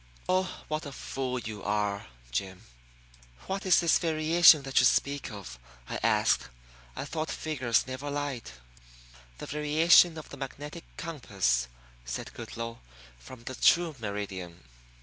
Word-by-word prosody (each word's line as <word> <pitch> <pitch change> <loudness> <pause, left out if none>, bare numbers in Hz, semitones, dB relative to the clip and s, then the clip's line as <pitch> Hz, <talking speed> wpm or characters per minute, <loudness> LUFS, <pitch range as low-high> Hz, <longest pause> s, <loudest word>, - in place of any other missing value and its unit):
Oh, 185 0 0
what 155 -1 -3
a - - -7
fool 130 -1 -4
you 110 -4 -6
are, 105 -1 -1 0.2
Jim!" 95 +9 -3 0.8
"What 195 0 -3
is 180 - +6
this 170 -2 +4
variation 160 -1 +6
that 135 -1 +2
you - - +5
speak 140 0 0
of?" 100 - -9 0.3
I - - -4
asked. - - +2 0.5
"I - - -4
thought 160 0 -3
figures 130 -7 0
never 130 +3 -5
lied." 145 - -3 0.9
"The - - -7
variation 160 +3 +5
of 155 - -9
the 140 - -9
magnetic 145 +4 -7
compass," 100 - 0 0.4
said - - -6
Goodloe, 115 0 -6 0.4
"from 120 - -12
the 130 - -6
true 165 +4 +3
meridian." 95 -5 -5
135 Hz, 135 wpm, -29 LUFS, 105-155 Hz, 0.9 s, is